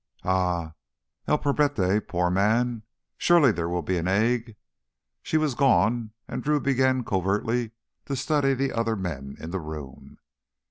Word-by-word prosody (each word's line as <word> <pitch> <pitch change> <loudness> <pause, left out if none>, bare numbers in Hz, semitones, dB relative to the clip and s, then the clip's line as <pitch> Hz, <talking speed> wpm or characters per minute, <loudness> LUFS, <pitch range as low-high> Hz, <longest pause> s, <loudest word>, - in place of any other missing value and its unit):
"Ah—el 85 - -2
pobrete—poor 105 -12 +1
man! 110 +5 +1 0.4
Surely 170 -7 +5
there 85 -3 -3
will 85 0 -2
be 95 - -1
an 85 - -2
egg!" 115 +3 +1 0.7
She 160 - 0
was 155 -3 +1
gone 120 -4 +2 0.2
and - - -4
Drew 150 0 +2
began 130 -2 +2
covertly 105 +4 -1 0.3
to 140 - -2
study 135 0 +1
the 135 +1 -1
other 115 -1 0
men 75 -9 -5
in 80 - -7
the 95 - -2
room. 75 -4 -9
110 Hz, 135 wpm, -26 LUFS, 90-130 Hz, 0.7 s, Surely